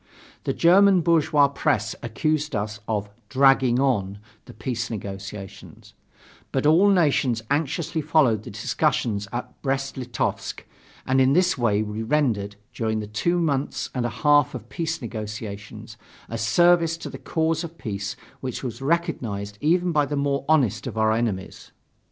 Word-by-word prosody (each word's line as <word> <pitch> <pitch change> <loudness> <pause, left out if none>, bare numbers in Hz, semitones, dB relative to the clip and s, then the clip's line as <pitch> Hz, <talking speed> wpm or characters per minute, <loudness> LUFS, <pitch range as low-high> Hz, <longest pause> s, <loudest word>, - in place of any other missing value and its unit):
The - - 0
German 190 +2 +5
bourgeois 155 -3 +4
press 115 -5 -1
accused 150 +5 -1
us 105 +1 -3
of 105 -2 -2 0.2
"dragging 130 0 +4
on" 100 -8 0 0.3
the - - -12
peace 120 +1 -3
negotiations; 100 -2 -8 0.6
but 135 - -1
all 170 +7 +5
nations 140 - +2
anxiously 155 +2 -1
followed 140 -8 +3
the - - -9
discussions 105 -3 -1
at 120 - -6
Brest 135 0 -2
Litovsk, 125 -2 -3 0.4
and 130 +1 +3
in 130 +1 +4
this 180 +2 +3
way 110 -4 +1
we 105 +1 -5
rendered, 110 -6 0 0.2
during 110 -1 -1
the 105 - -4
two 110 +12 0
months 145 -5 -1
and 125 - -1
a - - -8
half 145 -3 +5
of 120 -1 -8
peace 160 -2 -3
negotiations, 105 -1 -7 0.3
a 115 - -6
service 165 +7 +3
to 165 - -7
the 135 - -8
cause 160 +3 -1
of 165 0 -8
peace 100 -5 -4 0.2
which 130 -1 -5
was 125 0 -5
recognized 120 - -2
even 175 +3 +2
by 150 -3 +2
the 145 - -2
more 140 -1 0
honest 130 -9 +2
of - - -6
our 110 0 +3
enemies. 110 -4 -3
130 Hz, 150 wpm, -24 LUFS, 110-155 Hz, 0.6 s, German